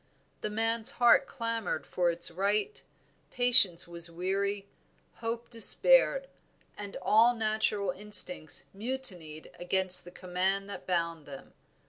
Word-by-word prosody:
The -, -, -4 dB
man's 225 Hz, +1 st, -2 dB
heart 240 Hz, +2 st, +3 dB
clamored 230 Hz, -, -5 dB
for 175 Hz, -1 st, -2 dB
its 170 Hz, 0 st, -1 dB
right, 205 Hz, -, -2 dB, 0.5 s
patience 245 Hz, -10 st, +4 dB
was 170 Hz, 0 st, -4 dB
weary, 195 Hz, +3 st, -4 dB, 0.5 s
hope 230 Hz, +1 st, -6 dB
despaired, -, -, +2 dB, 0.5 s
and 205 Hz, -1 st, -9 dB
all 230 Hz, +3 st, +3 dB
natural 215 Hz, -3 st, -2 dB
instincts 185 Hz, -5 st, +4 dB
mutinied 195 Hz, -9 st, -7 dB
against 185 Hz, +1 st, +3 dB
the 175 Hz, -, -13 dB
command 185 Hz, +2 st, -3 dB
that -, -, -10 dB
bound 170 Hz, -3 st, -3 dB
them. 135 Hz, -2 st, -13 dB
200 Hz, 115 wpm, -28 LUFS, 175-230 Hz, 0.5 s, patience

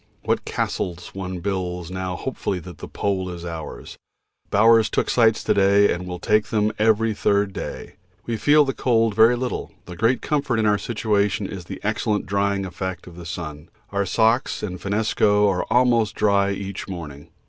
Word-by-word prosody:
What -, -, 0 dB
castles 90 Hz, -1 st, -3 dB
one 95 Hz, -2 st, -5 dB
builds 90 Hz, -2 st, -3 dB
now 95 Hz, 0 st, -3 dB
hopefully 130 Hz, -6 st, -3 dB
that 90 Hz, +1 st, -11 dB
the -, -, -7 dB
Pole 95 Hz, -2 st, -2 dB
is 85 Hz, -1 st, -7 dB
ours. 80 Hz, -2 st, -7 dB, 0.5 s
Bowers 110 Hz, +2 st, +5 dB
took -, -, 0 dB
sights 115 Hz, -2 st, +3 dB
to -, -, +2 dB
day 100 Hz, +1 st, +4 dB
and 90 Hz, +1 st, -6 dB
will 90 Hz, -1 st, -5 dB
take 105 Hz, +4 st, +1 dB
them 105 Hz, -1 st, +1 dB
every 110 Hz, 0 st, +3 dB
third 100 Hz, -1 st, +1 dB
day. -, -, -7 dB, 0.3 s
We 115 Hz, -, -2 dB
feel 145 Hz, +6 st, +4 dB
the 135 Hz, -, -1 dB
cold 115 Hz, -4 st, +2 dB
very 110 Hz, +3 st, +5 dB
little, 125 Hz, 0 st, -4 dB
the 90 Hz, -, -9 dB
great 115 Hz, +7 st, +1 dB
comfort 140 Hz, -6 st, 0 dB
of 110 Hz, -, +1 dB
our 105 Hz, -1 st, +3 dB
situation 105 Hz, -3 st, 0 dB
is 95 Hz, -3 st, -7 dB
the -, -, -7 dB
excellent 105 Hz, -1 st, 0 dB
drying 100 Hz, 0 st, 0 dB
effect 95 Hz, 0 st, -5 dB
of 90 Hz, -, -12 dB
the 85 Hz, -1 st, -9 dB
sun. 80 Hz, -3 st, -7 dB, 0.2 s
Our 100 Hz, -1 st, -1 dB
socks 115 Hz, +5 st, +1 dB
and 90 Hz, -3 st, -4 dB
finnesko 105 Hz, 0 st, +2 dB
are 95 Hz, -3 st, 0 dB
almost 120 Hz, -2 st, +3 dB
dry 100 Hz, -2 st, +2 dB
each 100 Hz, -1 st, -5 dB
morning. 75 Hz, -7 st, -8 dB
100 Hz, 180 wpm, -23 LUFS, 90-110 Hz, 0.5 s, Bowers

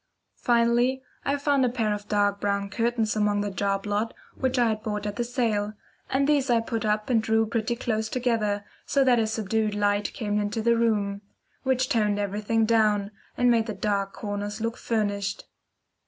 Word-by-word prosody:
Finally, 240 Hz, +2 st, +2 dB, 0.2 s
I 280 Hz, +1 st, 0 dB
found 280 Hz, -1 st, +2 dB
a 250 Hz, -, +3 dB
pair 225 Hz, -3 st, 0 dB
of 205 Hz, 0 st, -6 dB
dark 205 Hz, -1 st, +1 dB
brown 200 Hz, -1 st, -1 dB
curtains 230 Hz, -1 st, 0 dB
among 210 Hz, -1 st, +2 dB
the 205 Hz, 0 st, -2 dB
job 195 Hz, +1 st, -1 dB
lot 210 Hz, +2 st, -1 dB, 0.2 s
which 260 Hz, -1 st, -1 dB
I 240 Hz, -2 st, +4 dB
had 215 Hz, -1 st, -2 dB
bought 210 Hz, -1 st, -3 dB
at 205 Hz, -1 st, -3 dB
the 240 Hz, -, -1 dB
sale, 225 Hz, -4 st, -1 dB, 0.4 s
and 270 Hz, +1 st, +2 dB
these 285 Hz, -3 st, +2 dB
I 235 Hz, -1 st, +4 dB
put 230 Hz, 0 st, -3 dB
up 215 Hz, +2 st, 0 dB
and 225 Hz, -2 st, +4 dB
drew 220 Hz, 0 st, +2 dB
pretty 230 Hz, +1 st, -1 dB
close 220 Hz, -2 st, -2 dB
together, 220 Hz, -5 st, 0 dB, 0.2 s
so 275 Hz, -, +3 dB
that 250 Hz, -2 st, +4 dB
a 220 Hz, -, +1 dB
subdued 220 Hz, 0 st, -1 dB
light 205 Hz, 0 st, +1 dB
came 210 Hz, -2 st, -1 dB
into 210 Hz, +2 st, -2 dB
the 235 Hz, +1 st, +4 dB
room, 205 Hz, -3 st, +1 dB, 0.4 s
which 260 Hz, -1 st, +1 dB
toned 210 Hz, -4 st, +1 dB
everything 210 Hz, +2 st, 0 dB
down, 215 Hz, -2 st, +2 dB, 0.3 s
and 245 Hz, 0 st, +4 dB
made 230 Hz, -1 st, +2 dB
the 215 Hz, -, -4 dB
dark 200 Hz, -1 st, -1 dB
corners 205 Hz, 0 st, -4 dB
look 230 Hz, +1 st, -2 dB
furnished. 205 Hz, -4 st, -2 dB
220 Hz, 185 wpm, -26 LUFS, 205-235 Hz, 0.4 s, I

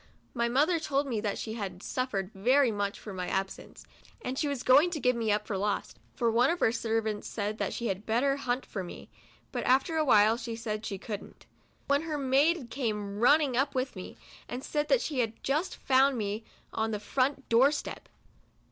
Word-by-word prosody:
My 235 Hz, -1 st, 0 dB
mother 305 Hz, +7 st, +3 dB
told 290 Hz, -2 st, 0 dB
me 235 Hz, -6 st, -2 dB
that 205 Hz, -2 st, -2 dB
she 220 Hz, -, -4 dB
had 195 Hz, -5 st, -5 dB
suffered 210 Hz, -7 st, -2 dB
very 250 Hz, +6 st, +3 dB
much 205 Hz, -1 st, -2 dB
for 205 Hz, -, -8 dB
my 180 Hz, -1 st, -4 dB
absence, 195 Hz, 0 st, -4 dB, 0.4 s
and 255 Hz, -, -3 dB
she 295 Hz, -, 0 dB
was 280 Hz, -4 st, -3 dB
going 285 Hz, +7 st, +6 dB
to 335 Hz, -3 st, -3 dB
give 250 Hz, -1 st, +2 dB
me 225 Hz, -2 st, 0 dB
up 210 Hz, 0 st, 0 dB
for 195 Hz, -3 st, -3 dB
lost, 205 Hz, +1 st, -2 dB, 0.2 s
(for 235 Hz, -2 st, +1 dB
one 240 Hz, +4 st, +4 dB
of 345 Hz, -, 0 dB
her 225 Hz, -, +3 dB
servants 220 Hz, -2 st, -1 dB
said 210 Hz, 0 st, -3 dB
that -, -, -1 dB
she 235 Hz, -, -4 dB
had 200 Hz, -1 st, -3 dB
bet 230 Hz, +3 st, +2 dB
ter 275 Hz, -1 st, +3 dB
hunt 255 Hz, -1 st, -2 dB
for 195 Hz, -, -5 dB
me, 175 Hz, -, -10 dB, 0.4 s
but -, -, -3 dB
after 270 Hz, +6 st, +3 dB
a 310 Hz, -, +3 dB
while 220 Hz, -4 st, +5 dB
she 230 Hz, -1 st, -5 dB
said 220 Hz, -2 st, -4 dB
she 195 Hz, -, -4 dB
couldn't,) 205 Hz, +1 st, -8 dB, 0.4 s
when 280 Hz, +1 st, +3 dB
her 315 Hz, -2 st, -3 dB
maid 275 Hz, +1 st, +2 dB
came 210 Hz, -6 st, -3 dB
run 250 Hz, +6 st, +7 dB
ning 285 Hz, -5 st, -1 dB
up 270 Hz, +3 st, +1 dB
with 255 Hz, -1 st, -1 dB
me, 185 Hz, -, -8 dB, 0.3 s
and 250 Hz, +2 st, -5 dB
said 295 Hz, 0 st, -1 dB
that -, -, +3 dB
she 285 Hz, -5 st, -2 dB
had 225 Hz, -2 st, +1 dB
just 300 Hz, +7 st, 0 dB
found 265 Hz, 0 st, +3 dB
me 210 Hz, 0 st, -3 dB, 0.3 s
on 220 Hz, 0 st, 0 dB
the 210 Hz, -2 st, -2 dB
front 265 Hz, +6 st, -1 dB
door 250 Hz, +5 st, +5 dB
step. 295 Hz, -, -5 dB
240 Hz, 215 wpm, -29 LUFS, 210-275 Hz, 0.4 s, run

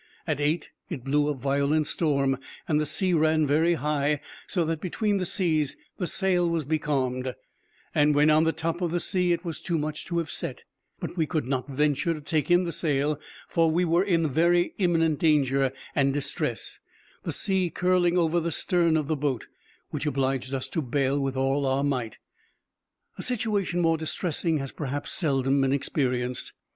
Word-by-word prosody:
At 155 Hz, -4 st, -1 dB
eight 150 Hz, +3 st, 0 dB, 0.2 s
it 145 Hz, -9 st, -5 dB
blew 145 Hz, +2 st, +2 dB
a 150 Hz, -, 0 dB
violent 140 Hz, +3 st, +1 dB
storm, 140 Hz, -4 st, +1 dB, 0.3 s
and 155 Hz, -2 st, +2 dB
the 150 Hz, -, -1 dB
sea 180 Hz, +4 st, +1 dB
ran 155 Hz, -1 st, +3 dB
very 160 Hz, +4 st, +3 dB
high, 150 Hz, -1 st, 0 dB, 0.3 s
so 175 Hz, -3 st, 0 dB
that 160 Hz, -1 st, -2 dB
between 205 Hz, +3 st, 0 dB
the 185 Hz, -2 st, -1 dB
seas 155 Hz, -7 st, +1 dB, 0.2 s
the 180 Hz, -, -1 dB
sail 180 Hz, -3 st, +1 dB
was 165 Hz, -3 st, -1 dB
becalmed, 130 Hz, -4 st, -1 dB, 0.6 s
and 150 Hz, -1 st, +3 dB
when 150 Hz, +1 st, +5 dB
on 155 Hz, +1 st, +5 dB
the 160 Hz, -, +3 dB
top 165 Hz, +2 st, -3 dB
of 175 Hz, -, +1 dB
the 175 Hz, +2 st, 0 dB
sea, 180 Hz, 0 st, +1 dB
it 170 Hz, +1 st, -1 dB
was 165 Hz, -2 st, -4 dB
too 170 Hz, -, -1 dB
much 155 Hz, 0 st, -3 dB
to 170 Hz, -, -3 dB
have 165 Hz, -3 st, -1 dB
set; -, -, -4 dB, 0.4 s
but -, -, -6 dB
we 160 Hz, -2 st, +1 dB
could 155 Hz, -5 st, -1 dB
not 130 Hz, 0 st, -2 dB
venture 150 Hz, +4 st, +1 dB
to -, -, -7 dB
take 150 Hz, +1 st, -1 dB
in 175 Hz, +1 st, +5 dB
the 170 Hz, -, -2 dB
sail, 150 Hz, -2 st, 0 dB, 0.3 s
for 165 Hz, -1 st, +2 dB
we 175 Hz, +3 st, +2 dB
were 170 Hz, +1 st, +3 dB
in 170 Hz, -5 st, +2 dB
very 170 Hz, +4 st, +2 dB
imminent 165 Hz, -5 st, +2 dB
danger 140 Hz, -4 st, +3 dB, 0.2 s
and 140 Hz, -1 st, +2 dB
distress, 140 Hz, 0 st, -2 dB, 0.4 s
the -, -, -3 dB
sea 190 Hz, -3 st, 0 dB
curling 180 Hz, +1 st, +2 dB
over 170 Hz, 0 st, +2 dB
the 170 Hz, 0 st, -2 dB
stern 170 Hz, -1 st, +2 dB
of 150 Hz, -3 st, -1 dB
the 155 Hz, -, +1 dB
boat, 140 Hz, -5 st, -2 dB, 0.5 s
which 150 Hz, +1 st, -3 dB
obliged 135 Hz, -2 st, -1 dB
us 135 Hz, -1 st, -3 dB
to 165 Hz, -, -2 dB
bail 135 Hz, +1 st, 0 dB
with 135 Hz, -1 st, -2 dB
all 135 Hz, +2 st, +1 dB
our 135 Hz, +1 st, +1 dB
might. 125 Hz, -6 st, -2 dB, 1.0 s
A -, -, -2 dB
situation 210 Hz, -7 st, 0 dB
more 165 Hz, -1 st, +3 dB
distressing 160 Hz, 0 st, 0 dB
has 135 Hz, -2 st, -4 dB
perhaps 145 Hz, -1 st, -3 dB
seldom 135 Hz, -4 st, +2 dB
been 135 Hz, 0 st, +2 dB
experienced. 125 Hz, -3 st, -1 dB
155 Hz, 185 wpm, -26 LUFS, 140-170 Hz, 1.0 s, when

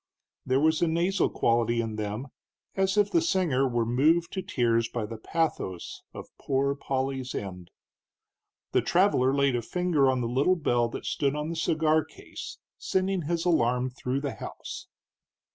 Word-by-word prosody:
There 130 Hz, +1 st, +3 dB
was 160 Hz, +1 st, +2 dB
a 170 Hz, -, +3 dB
nasal 175 Hz, +4 st, +1 dB
quality 115 Hz, 0 st, +1 dB
in 115 Hz, -2 st, -2 dB
them, 110 Hz, +5 st, -4 dB, 0.5 s
as 190 Hz, +1 st, +1 dB
if 205 Hz, -1 st, +3 dB
the 335 Hz, -, +3 dB
singer 170 Hz, -, +1 dB
were 120 Hz, -2 st, 0 dB
moved 155 Hz, +9 st, +2 dB
to 190 Hz, -, -2 dB
tears 115 Hz, -, +1 dB
by 120 Hz, -3 st, -3 dB
the 110 Hz, +1 st, -8 dB
pathos 135 Hz, -, -2 dB
of -, -, -11 dB
Poor 140 Hz, 0 st, +1 dB
Polly's 135 Hz, -2 st, -3 dB
end. 90 Hz, -3 st, -6 dB, 1.0 s
The -, -, +3 dB
traveler 175 Hz, -8 st, +3 dB
laid 140 Hz, -2 st, +2 dB
a 120 Hz, -, 0 dB
finger 165 Hz, -1 st, +1 dB
on 130 Hz, -1 st, +1 dB
the 120 Hz, -, -1 dB
little 135 Hz, +10 st, +2 dB
bell 120 Hz, -8 st, +1 dB
that -, -, -7 dB
stood 140 Hz, 0 st, 0 dB
on 150 Hz, +1 st, -3 dB
the 170 Hz, -, -3 dB
cigar 160 Hz, -1 st, +2 dB
case, -, -, -10 dB, 0.2 s
sending 190 Hz, 0 st, 0 dB
his 170 Hz, 0 st, -1 dB
alarm 125 Hz, -6 st, +2 dB
through 130 Hz, +2 st, -3 dB
the 140 Hz, -2 st, -3 dB
house. -, -, -8 dB
135 Hz, 165 wpm, -27 LUFS, 120-170 Hz, 1.0 s, There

